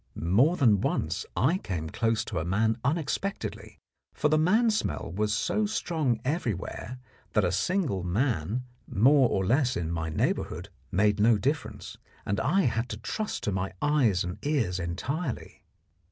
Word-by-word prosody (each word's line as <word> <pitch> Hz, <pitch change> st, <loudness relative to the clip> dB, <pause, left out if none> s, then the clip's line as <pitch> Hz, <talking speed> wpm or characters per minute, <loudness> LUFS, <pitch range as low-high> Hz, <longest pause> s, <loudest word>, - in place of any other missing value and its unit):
More 120 Hz, -, +3 dB
than 110 Hz, -8 st, +4 dB
once -, -, -1 dB
I 140 Hz, -, +3 dB
came 85 Hz, -, -4 dB
close 115 Hz, -1 st, 0 dB
to -, -, -3 dB
a -, -, -2 dB
man 110 Hz, +6 st, +1 dB
unexpectedly, 160 Hz, +7 st, -2 dB, 0.4 s
for 150 Hz, -, +1 dB
the 155 Hz, -, +3 dB
man 220 Hz, +8 st, +4 dB
smell 210 Hz, -, -2 dB
was 105 Hz, +1 st, 0 dB
so 155 Hz, -, +1 dB
strong 160 Hz, -, -1 dB
everywhere 125 Hz, -, -3 dB, 0.4 s
that 105 Hz, -, +3 dB
a 90 Hz, -, +1 dB
single 130 Hz, -, 0 dB
man 105 Hz, -, -1 dB, 0.2 s
more 130 Hz, +4 st, +4 dB
or 95 Hz, -, 0 dB
less 130 Hz, +4 st, +2 dB
in 85 Hz, -1 st, -2 dB
my 80 Hz, -1 st, -2 dB
neighbourhood 80 Hz, +3 st, -1 dB, 0.2 s
made 105 Hz, +2 st, +2 dB
no 110 Hz, +1 st, +5 dB
difference, 140 Hz, +6 st, -3 dB, 0.3 s
and 100 Hz, +1 st, -1 dB
I 190 Hz, +11 st, +2 dB
had 115 Hz, -, 0 dB
to 105 Hz, -, -4 dB
trust 210 Hz, -, -4 dB
to 105 Hz, -, 0 dB
my 95 Hz, 0 st, -2 dB
eyes 130 Hz, -11 st, +2 dB
and 90 Hz, +1 st, -5 dB
ears 125 Hz, -12 st, 0 dB
entirely. 125 Hz, -, -4 dB
115 Hz, 155 wpm, -28 LUFS, 95-150 Hz, 0.4 s, no